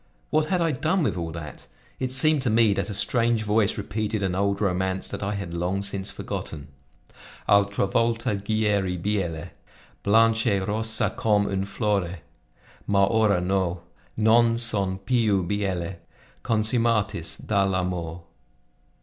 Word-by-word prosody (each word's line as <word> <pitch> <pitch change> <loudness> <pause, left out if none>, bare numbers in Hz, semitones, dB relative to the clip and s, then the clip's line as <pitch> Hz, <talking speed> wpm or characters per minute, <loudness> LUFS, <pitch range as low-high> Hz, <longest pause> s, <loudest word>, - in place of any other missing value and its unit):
What 155 0 +2
had 180 +1 0
I 165 -1 +2
done 160 +6 0
with 140 - 0
all 85 -2 -4
that? 75 -3 -9 0.3
It 130 -1 -2
seemed 150 +2 +3
to 125 - 0
me 110 -1 +4
that 100 - -2
a - - -3
strange 115 +1 +2
voice 105 0 +1
repeated 105 0 -2
an 95 -2 0
old 100 +1 0
romance 95 -1 0
that - - -5
I 100 +1 -2
had 100 -4 -5
long 90 +3 -1
since 100 -1 -3
forgotten: 70 -3 -6 0.8
Altra 100 0 +3
volta 115 +3 0
gieri 100 -3 0
biele, 90 -3 -2 0.5
Blanch' 115 +2 +3
e 100 -3 +3
rossa 110 +3 -1
com' 105 -2 +2
un 95 -1 -1
flore, 100 -4 -1 0.7
Ma 100 -1 +3
ora 105 -3 +2
no. 90 -1 -1 0.4
Non 115 +1 +4
son 100 -5 -1
piu 105 -3 +1
biele 95 -2 -2 0.4
Consumatis 110 -5 0
dal' 100 -2 +1
amore. 90 -2 -3
100 Hz, 140 wpm, -25 LUFS, 95-115 Hz, 0.8 s, me